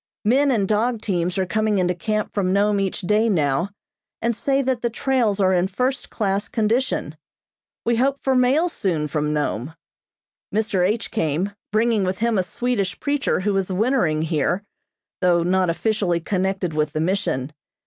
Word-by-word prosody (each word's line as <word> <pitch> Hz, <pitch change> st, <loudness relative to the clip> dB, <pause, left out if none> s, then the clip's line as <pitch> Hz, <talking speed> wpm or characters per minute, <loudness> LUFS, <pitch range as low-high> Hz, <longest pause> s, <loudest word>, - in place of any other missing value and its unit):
Men 270 Hz, +6 st, +4 dB
and 215 Hz, -7 st, +1 dB
dog 225 Hz, +3 st, +1 dB
teams 180 Hz, -2 st, -1 dB
are 190 Hz, -, +1 dB
coming 215 Hz, +2 st, 0 dB
into 180 Hz, -1 st, +2 dB
camp 215 Hz, +4 st, -2 dB
from 190 Hz, -3 st, 0 dB
Nome 200 Hz, +1 st, +2 dB
each 195 Hz, 0 st, -2 dB
day 210 Hz, +4 st, +2 dB
now, 155 Hz, -1 st, +1 dB, 0.5 s
and 235 Hz, +1 st, 0 dB
say 275 Hz, +3 st, +1 dB
that 255 Hz, -2 st, -1 dB
the 235 Hz, -, 0 dB
trails 235 Hz, -4 st, 0 dB
are 190 Hz, -1 st, +3 dB
in 180 Hz, 0 st, +2 dB
first 255 Hz, +7 st, -2 dB
class 200 Hz, -2 st, -1 dB
condition. 230 Hz, +4 st, 0 dB, 0.7 s
We 235 Hz, 0 st, +2 dB
hope 270 Hz, +3 st, +2 dB
for 265 Hz, -, +2 dB
mail 260 Hz, +7 st, +3 dB
soon 175 Hz, -, -1 dB
from 150 Hz, 0 st, -1 dB
Nome. 150 Hz, -1 st, -2 dB, 0.8 s
Mr. 210 Hz, -3 st, +1 dB
H. 210 Hz, +5 st, 0 dB
came, 165 Hz, 0 st, -1 dB, 0.2 s
bringing 220 Hz, -1 st, +2 dB
with 185 Hz, 0 st, -1 dB
him 230 Hz, -2 st, +1 dB
a -, -, +4 dB
Swedish 200 Hz, -1 st, -2 dB
preacher 285 Hz, -8 st, 0 dB
who 205 Hz, +1 st, 0 dB
is 190 Hz, 0 st, -1 dB
wintering 185 Hz, -, +1 dB
here, 165 Hz, +4 st, 0 dB, 0.6 s
though 175 Hz, -2 st, +3 dB
not 185 Hz, 0 st, +2 dB
officially 185 Hz, -1 st, 0 dB
connected 190 Hz, -1 st, -1 dB
with 150 Hz, -1 st, 0 dB
the 155 Hz, -, -1 dB
Mission. 160 Hz, -6 st, -1 dB
200 Hz, 170 wpm, -22 LUFS, 180-230 Hz, 0.8 s, Men